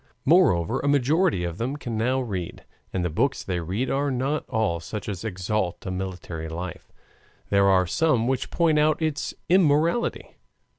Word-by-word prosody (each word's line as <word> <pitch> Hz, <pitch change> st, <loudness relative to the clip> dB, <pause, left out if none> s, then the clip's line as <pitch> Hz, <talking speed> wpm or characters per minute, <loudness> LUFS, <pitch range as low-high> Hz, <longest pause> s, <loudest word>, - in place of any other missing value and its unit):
Moreover, 135 Hz, -, +4 dB
a -, -, -2 dB
majority 145 Hz, -, +2 dB
of 85 Hz, +2 st, -4 dB
them 125 Hz, +5 st, -2 dB
can 120 Hz, -5 st, -5 dB
now 125 Hz, +4 st, +1 dB
read, 95 Hz, -8 st, -5 dB, 0.3 s
and 90 Hz, -2 st, -1 dB
the -, -, 0 dB
books 135 Hz, -, 0 dB
they 90 Hz, -2 st, -2 dB
read 95 Hz, +10 st, -2 dB
are 140 Hz, +1 st, +1 dB
not 135 Hz, +4 st, -2 dB
all 110 Hz, -8 st, 0 dB
such 100 Hz, +3 st, -6 dB
as 100 Hz, -3 st, -4 dB
exalt 95 Hz, -2 st, -2 dB
a 95 Hz, -, -3 dB
military 90 Hz, -3 st, -5 dB
life; 85 Hz, +1 st, -7 dB, 0.6 s
there 100 Hz, -1 st, +4 dB
are 95 Hz, -1 st, +4 dB
some 125 Hz, -, +1 dB
which 130 Hz, -1 st, -1 dB
point 160 Hz, -3 st, +2 dB
out 155 Hz, 0 st, +3 dB
its 155 Hz, -3 st, -2 dB
immorality. 170 Hz, +4 st, +2 dB
115 Hz, 165 wpm, -25 LUFS, 90-145 Hz, 0.6 s, Moreover